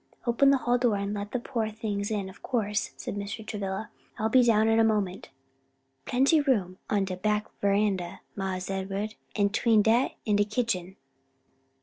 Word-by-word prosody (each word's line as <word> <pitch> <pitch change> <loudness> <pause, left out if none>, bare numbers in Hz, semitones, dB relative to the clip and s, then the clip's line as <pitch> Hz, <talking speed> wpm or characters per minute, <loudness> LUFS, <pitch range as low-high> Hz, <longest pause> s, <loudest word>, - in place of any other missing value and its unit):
Open 245 +3 +4
the 275 - +5
hall 245 -1 +1
door 240 -4 +2
and 200 +1 -2
let 205 0 -5
the - - 0
poor 235 -3 -2
things 210 -2 -3
in, 205 -3 -2
of 190 - -13
course," 210 -4 -1
said - - -5
Mr. 205 +2 -5
Travilla, 205 0 -4 0.3
"and - - -4
I'll 220 - +2
be 255 +3 +6
down 220 -2 +4
in 225 0 +4
a - - +6
moment." 205 -4 0 0.8
"Plenty 275 +5 +3
room 200 -10 0
on 200 -2 +2
de 185 -1 -4
back 210 +2 0 0.2
veranda, 200 -3 0
Mars 190 -1 -3
Ed'ard, 195 +2 -3 0.2
an' 205 -1 +3
'tween 220 0 +3
dat 230 +4 +2
an' 210 -2 +2
de 205 - +4
kitchen." 205 -4 -2
210 Hz, 185 wpm, -28 LUFS, 200-225 Hz, 0.8 s, be